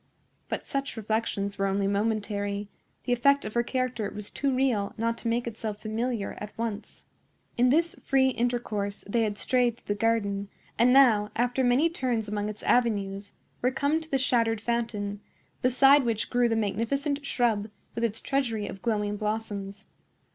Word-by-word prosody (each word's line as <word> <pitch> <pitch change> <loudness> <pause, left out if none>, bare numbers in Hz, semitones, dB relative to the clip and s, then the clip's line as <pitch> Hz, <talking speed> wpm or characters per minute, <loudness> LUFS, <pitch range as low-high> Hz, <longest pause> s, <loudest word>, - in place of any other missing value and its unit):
But - - -3
such 275 -3 -3
reflections 205 -2 -2
were 195 - +2
only 195 0 0
momentary; 205 0 -1 0.3
the 245 - +1
effect 280 +4 +3
of 215 - -5
her 235 - +3
character 245 -3 -2
was 210 -1 -8
too 280 -1 0
real 255 -6 +1
not 230 +1 0
to - - -4
make 235 +1 0
itself 220 -2 -5
familiar 225 0 -2
at 210 0 -8
once. 225 -2 -5 0.5
In 250 0 +4
this 330 +5 +3
free 265 -1 +3
intercourse 235 -5 -2
they 230 +3 +1
had 210 -2 -1
strayed 245 -1 +2
through 205 - -3
the 205 - -10
garden, 200 -3 0 0.3
and 240 +2 +4
now, 235 -6 +5
after 245 +2 +1
many 250 +6 +4
turns 250 -9 -1
among 205 0 -2
its 210 - -8
avenues, 200 -4 +1 0.3
were 250 - +3
come 285 +4 0
to 320 - -12
the 275 - +2
shattered 230 -4 +2
fountain, 215 -3 -2 0.4
beside 270 +3 +6
which 225 -3 -1
grew 245 -1 +3
the 225 - +1
magnificent 255 +8 -1
shrub, 225 -6 0 0.2
with 230 - -3
its 225 -1 -1
treasury 235 -6 -1
of 195 - -8
glowing 210 -2 -1
blossoms. 210 -1 -4
230 Hz, 170 wpm, -27 LUFS, 205-250 Hz, 0.5 s, beside